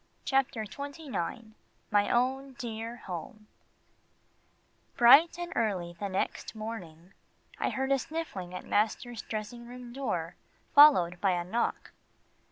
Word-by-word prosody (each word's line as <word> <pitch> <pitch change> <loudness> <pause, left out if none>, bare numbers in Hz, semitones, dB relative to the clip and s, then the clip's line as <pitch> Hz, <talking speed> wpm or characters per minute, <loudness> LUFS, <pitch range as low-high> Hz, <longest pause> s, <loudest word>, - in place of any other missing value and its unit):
CHAPTER 265 -5 +1
XXIX 270 - -5 0.4
MY 205 -1 +3
OWN 265 +2 0
DEAR 230 -1 -5
HOME 190 +4 -7 1.5
Bright 280 +9 +7
and 350 0 -5
early 185 -6 -1
the 200 - -3
next 190 +3 -3
morning, 190 -6 -8 0.5
I - - +1
heard 265 +1 -2
a 275 - +4
sniffling 305 - -5
at - - -7
master's 225 +2 0
dressing 225 +2 -6
room 245 0 -10
door, 210 -11 -3 0.4
followed 225 - +7
by 195 -2 +3
a 175 -1 -1
knock. 225 +7 -2
230 Hz, 120 wpm, -30 LUFS, 195-265 Hz, 1.5 s, Bright